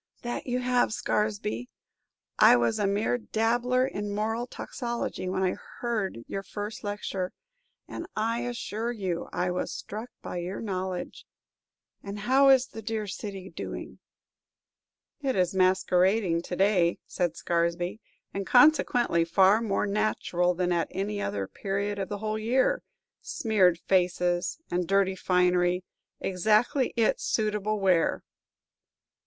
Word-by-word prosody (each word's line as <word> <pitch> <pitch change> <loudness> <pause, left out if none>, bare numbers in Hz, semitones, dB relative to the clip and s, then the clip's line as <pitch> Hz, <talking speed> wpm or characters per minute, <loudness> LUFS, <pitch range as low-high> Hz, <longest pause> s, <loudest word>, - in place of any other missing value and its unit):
"That 240 +2 -4
you 250 0 0
have, 250 -2 +2
Scaresby. 205 - -1 0.7
I - - +8
was 120 -1 +1
a 205 - +2
mere 210 +5 +1
dabbler 240 +3 +1
in 205 -6 -4
moral 225 +3 -1
toxicology 235 -7 -4
when 190 +1 -1
I 185 - +2 0.3
heard 215 - -2
your 195 - -4
first 205 +2 -6
lecture, 200 -3 -3 0.5
and, 335 - -6
I 225 +2 0
assure 235 -1 -3
you, 190 -7 -3
I 180 0 -1
was 180 - -2
struck 220 +4 -6
by - - -5
your 175 +2 -4
knowledge. 185 -4 -4 0.7
And 200 +1 -6
how 265 +6 +4
is 260 -1 +6
the 225 - -9
dear 220 0 -3
city 195 -1 -6
doing?" - - -7 1.2
"It 270 -2 0
is 180 0 +1
masquerading 185 0 +3
to 180 - -4
day," 185 -3 +3
said 175 -3 -1
Scaresby, 170 +4 -1 0.3
"and, 195 -1 -3
consequently, 245 - +4
far 190 +5 +4
more 210 -3 0
natural 200 -4 0
than 180 0 0
at 170 -1 +1
any 205 +2 -3
other 100 - -2
period 200 - -3
of 195 - -3
the 205 - -3
whole 215 +1 -2
year. 260 - +2 0.4
Smeared 195 -7 +2
faces 180 -1 +1
and 175 -1 0
dirty 195 0 +2
finery, 180 -1 +2 0.4
exactly 220 - +2
its 225 -2 +2
suitable 215 -1 0
wear!" 185 -4 +2
200 Hz, 135 wpm, -28 LUFS, 180-225 Hz, 1.2 s, I